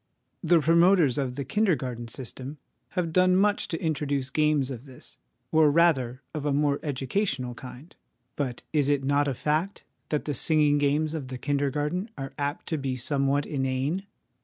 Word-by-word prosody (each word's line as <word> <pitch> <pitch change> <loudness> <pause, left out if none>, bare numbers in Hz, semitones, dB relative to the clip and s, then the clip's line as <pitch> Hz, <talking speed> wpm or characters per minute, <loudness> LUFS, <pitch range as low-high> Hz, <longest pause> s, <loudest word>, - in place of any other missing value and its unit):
The 175 -1 +5
promoters 165 -3 +4
of 130 -3 -2
the 140 0 -4
kindergarten 130 - 0
system 130 +4 -7 0.4
have 170 -3 0
done 185 +1 +4
much 205 +2 +2
to 165 - -3
introduce 145 -4 -1
games 150 -2 +2
of 125 +1 -7
this, 130 -3 -12 0.3
or 155 -1 +5
rather 140 -6 +2
of 155 -3 -4
a 145 - 0
more 140 0 +1
educational 135 - -2
kind; 130 +6 -11 0.4
but 130 -4 -3
is 145 -2 +2
it 145 -2 +1
not 145 +1 +2
a 135 - -1
fact 155 - -1 0.3
that 150 - -1
the 145 - -1
singing 150 +1 +3
games 150 +2 +1
of 150 -5 -4
the 130 0 -6
kindergarten 145 - -1
are 135 0 -6
apt 145 +2 -2
to 160 -3 -1
be 135 -2 -2
somewhat 140 +2 +1
inane? 135 +7 -2
145 Hz, 165 wpm, -27 LUFS, 135-160 Hz, 0.4 s, The